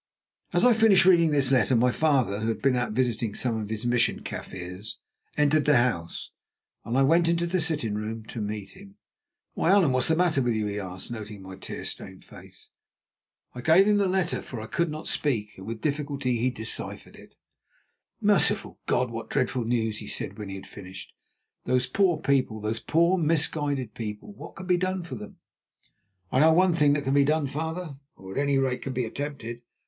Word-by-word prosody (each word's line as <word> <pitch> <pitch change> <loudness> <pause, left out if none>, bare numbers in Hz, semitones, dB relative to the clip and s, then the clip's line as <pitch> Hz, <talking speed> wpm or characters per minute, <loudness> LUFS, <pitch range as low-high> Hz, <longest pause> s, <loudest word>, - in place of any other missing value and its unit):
As - - +3
I 250 - +7
finished 220 -5 +5
reading 170 -3 +6
this 140 -3 +2
letter 130 0 +3
my 125 +2 +3
father, 130 -9 +1
who 110 - -2
had 115 - -1
been 135 -2 +3
out 120 -3 -1
visiting 115 -3 -1
some 120 -3 0
of 105 - -6
his 110 +1 -4
Mission 120 -1 +1
Kaffirs, 90 +4 -7 0.4
entered 150 0 +3
the 150 -3 +5
house, 115 -9 -1 0.5
and 120 +3 -2
I 135 - +5
went 165 +5 +4
into 170 0 +1
the 180 +2 0
sitting 150 -10 0
room 110 +1 -4
to 115 - -5
meet 105 -1 -5
him. 195 0 -14 0.6
"Why, - - 0
Allan, 190 -8 +5
what 130 -1 +1
is - - +1
the 160 - +3
matter 170 -5 +2
with 120 -2 +1
you?" 110 -1 -1
he 105 0 -3
asked, 95 +2 -7
noting 105 -3 -7
my 95 0 -9
tear 95 - -7
stained - - -8
face. - - -15 0.8
I 125 - -7
gave 165 +8 +5
him 210 -1 +4
the 200 -1 +2
letter, 185 -2 0
for 120 - -7
I 110 - -6
could 170 +8 -1
not 155 +1 -6
speak, 110 -8 -1
and 95 - -10
with 115 -1 -5
difficulty 140 -5 -1
he 125 +3 +2
deciphered 110 -3 -5
it. - - -16 0.8
"Merciful - - +2
God, 125 -2 +1
what 115 0 -6
dreadful 130 -3 0
news!" 110 -2 0
he - - -8
said - - -3
when 105 -2 -6
he 95 - -5
had 95 - -9
finished. 95 -2 -11 0.5
"Those 125 0 +2
poor 175 +5 +2
people! 135 -7 0
those 110 +2 -2
poor, 170 +7 +2
misguided 145 -6 0
people! 105 - -6
What - - -11
can 190 - -8
be 180 -1 +3
done 185 0 -1
for 165 -5 -8
them?" 105 -4 -8 0.9
"I 130 - +2
know 160 +2 +6
one 180 +1 +4
thing 150 -3 +4
that 145 0 -1
can 135 0 0
be 140 0 +5
done, 150 +1 +1
father, 160 +2 -4 0.2
or 95 0 -11
at - - -2
any 140 -1 +2
rate 130 -2 0
can 135 - -4
be 125 -1 -1
attempted. 120 -2 -6
130 Hz, 205 wpm, -26 LUFS, 110-160 Hz, 0.9 s, I